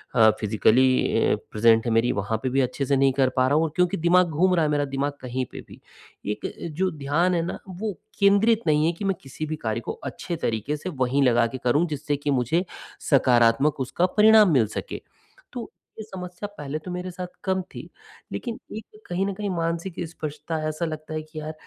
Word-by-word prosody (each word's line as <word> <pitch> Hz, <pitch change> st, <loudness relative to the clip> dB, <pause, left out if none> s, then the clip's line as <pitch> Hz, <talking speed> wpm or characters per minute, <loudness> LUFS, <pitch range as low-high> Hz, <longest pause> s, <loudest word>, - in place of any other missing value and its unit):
अ, 110 Hz, -2 st, +7 dB
physically 115 Hz, +4 st, +3 dB
अ, -, -, +2 dB, 0.2 s
present 115 Hz, +1 st, +4 dB
है 120 Hz, -, 0 dB
मेरी 115 Hz, +2 st, +3 dB
वहाँ 100 Hz, +3 st, -1 dB
पे 130 Hz, -, 0 dB
भी 135 Hz, +2 st, +2 dB
अच्छे 135 Hz, +2 st, -1 dB
से 140 Hz, -, +2 dB
नहीं 135 Hz, 0 st, +4 dB
कर 130 Hz, -1 st, +2 dB
पा 130 Hz, 0 st, +3 dB
रहा 140 Hz, -, +2 dB
हूँ 160 Hz, -, +3 dB
और 165 Hz, -, 0 dB
क्योंकि 180 Hz, +2 st, +2 dB
दिमाग 175 Hz, +2 st, +4 dB
घूम 180 Hz, +4 st, +2 dB
रहा 165 Hz, -, +2 dB
है -, -, 0 dB
मेरा 145 Hz, -1 st, +1 dB
दिमाग 140 Hz, +1 st, -2 dB
कहीं 130 Hz, 0 st, -3 dB
पे -, -, -8 dB
भी, -, -, -14 dB, 0.5 s
एक 105 Hz, +1 st, -3 dB, 0.3 s
जो 190 Hz, +1 st, +2 dB
ध्यान 155 Hz, +4 st, 0 dB
है 170 Hz, -, +1 dB
ना, -, -, -4 dB
वो 200 Hz, +3 st, -4 dB, 0.3 s
केंद्रित 205 Hz, +3 st, +4 dB
नहीं 150 Hz, 0 st, +3 dB
है 165 Hz, -, +3 dB
कि 185 Hz, +4 st, -6 dB
मैं 195 Hz, -1 st, +1 dB
किसी 135 Hz, +3 st, -6 dB
भी 155 Hz, 0 st, -3 dB
कार्य 110 Hz, -6 st, -3 dB
को -, -, -4 dB
अच्छे 175 Hz, -, -4 dB
तरीके 115 Hz, -1 st, -2 dB
से 170 Hz, +5 st, -5 dB
वहीं 135 Hz, -2 st, +1 dB
लगा 120 Hz, -2 st, +4 dB
के 115 Hz, -, -6 dB
करूँ 145 Hz, +7 st, +3 dB
जिससे 150 Hz, -1 st, -2 dB
कि 145 Hz, +1 st, -2 dB
मुझे 135 Hz, +7 st, +1 dB, 0.5 s
सकारात्मक 125 Hz, +1 st, +4 dB
उसका 135 Hz, +7 st, 0 dB
परिणाम 215 Hz, -2 st, +7 dB
मिल 120 Hz, -6 st, +4 dB
सके। -, -, -6 dB, 0.5 s
तो 240 Hz, -2 st, -6 dB, 0.3 s
ये -, -, -4 dB
समस्या 185 Hz, -1 st, -7 dB
पहले 145 Hz, +1 st, -4 dB
तो 180 Hz, -, -5 dB
मेरे 180 Hz, +1 st, -4 dB
साथ 180 Hz, 0 st, -6 dB, 0.2 s
कम 190 Hz, -1 st, 0 dB
थी, 185 Hz, -, -11 dB, 0.4 s
लेकिन 235 Hz, -3 st, -5 dB, 0.2 s
एक 215 Hz, 0 st, -12 dB
कहीं 180 Hz, +2 st, 0 dB
न 200 Hz, -, -2 dB
कहीं 205 Hz, +1 st, -4 dB
मानसिक 170 Hz, 0 st, -2 dB
स्पर्शता 155 Hz, 0 st, -5 dB
ऐसा 155 Hz, +3 st, -3 dB
लगता 155 Hz, -1 st, -6 dB
है 155 Hz, -, -2 dB
कि 155 Hz, 0 st, -9 dB
यार 155 Hz, +1 st, -5 dB
155 Hz, 215 wpm, -24 LUFS, 130-180 Hz, 0.5 s, अ